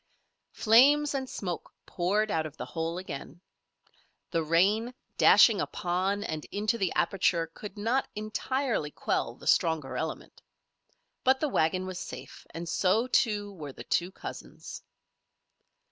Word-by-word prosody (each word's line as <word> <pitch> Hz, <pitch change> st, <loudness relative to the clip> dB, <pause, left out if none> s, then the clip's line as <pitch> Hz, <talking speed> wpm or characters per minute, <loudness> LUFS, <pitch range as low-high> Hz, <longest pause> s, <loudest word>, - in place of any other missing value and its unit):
Flames 285 Hz, +7 st, +5 dB
and 265 Hz, -2 st, -3 dB
smoke 180 Hz, -4 st, -5 dB
poured 205 Hz, +4 st, 0 dB
out 160 Hz, -3 st, 0 dB
of 155 Hz, -, -14 dB
the -, -, -5 dB
hole 165 Hz, +1 st, -3 dB
again. 165 Hz, -3 st, -7 dB, 0.9 s
The 165 Hz, -, +1 dB
rain 200 Hz, +10 st, +2 dB, 0.2 s
dashing -, -, +7 dB
upon 185 Hz, +3 st, -1 dB
and 155 Hz, -6 st, -4 dB
into 215 Hz, +3 st, -1 dB
the 190 Hz, -, +1 dB
aperture 180 Hz, -4 st, +2 dB
could 210 Hz, -1 st, -9 dB
not 230 Hz, +6 st, 0 dB
entirely 220 Hz, -, -2 dB
quell -, -, -2 dB
the -, -, -15 dB
stronger 160 Hz, -5 st, +2 dB
element. 160 Hz, -1 st, -5 dB, 0.8 s
But 265 Hz, +1 st, +4 dB
the 305 Hz, -, 0 dB
wagon 185 Hz, -3 st, +1 dB
was 185 Hz, -1 st, -5 dB
safe, -, -, -9 dB
and 170 Hz, +1 st, -7 dB
so, 190 Hz, +7 st, +2 dB
too, 210 Hz, -5 st, +1 dB
were 150 Hz, -7 st, -8 dB
the -, -, -9 dB
two 175 Hz, +1 st, 0 dB
cousins. -, -, -9 dB
190 Hz, 135 wpm, -29 LUFS, 165-220 Hz, 0.9 s, dashing